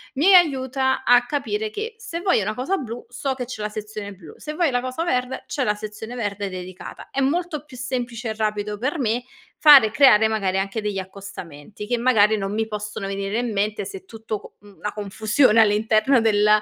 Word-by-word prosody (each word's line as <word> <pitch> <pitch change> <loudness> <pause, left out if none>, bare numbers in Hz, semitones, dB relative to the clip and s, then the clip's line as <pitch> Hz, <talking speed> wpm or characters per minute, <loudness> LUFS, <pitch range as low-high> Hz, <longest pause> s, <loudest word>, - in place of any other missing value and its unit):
Mi 295 +7 +2
e 390 - +8
aiuta 265 -5 +2
a 245 0 +5
capire 360 - -2
che 435 +2 -5
se 445 -8 -6
voglio 365 - +2
una 215 - -2
cosa 315 +11 -1
blu, 240 -4 -6
so 265 +2 -3
che 250 -1 -4
c'è 235 -3 -7
la 210 - -2
sezione 210 -1 -7
blu. 175 -6 -13
Se 300 - -7
voglio 320 -2 +1
la 245 -1 0
cosa 255 +5 -3
verde, 255 -5 -1
c'è 280 - -2
la 210 - +2
sezione 215 +2 -8
verde 205 -4 -3
dedicata. 185 0 -9
È - - -2
molto 305 +2 -1
più 265 -4 -13
semplice 245 -2 -4
e 220 - -3
rapido 210 -1 -2
per 275 +8 -2
me 235 0 0 0.4
fare 285 -7 +9
e - - -7
creare, 220 -5 +6
magari, 195 -4 0
anche 195 +3 -2
degli 210 -1 -3
accostamenti, 190 -2 -9
che 240 +3 -1
magari 220 -3 +4
non 195 0 -3
mi 220 +1 0
possono 210 -2 -5
venire 195 +2 -2
in 240 -1 -2
mente 210 +1 -1
se 390 -1 -8
tutto 220 - -6
co - - -15
mhmm, 205 -1 -18
la 210 - -2
confusione 215 +3 +2
all'interno 220 +4 +3
del 210 -2 +3
225 Hz, 210 wpm, -22 LUFS, 210-265 Hz, 0.4 s, fare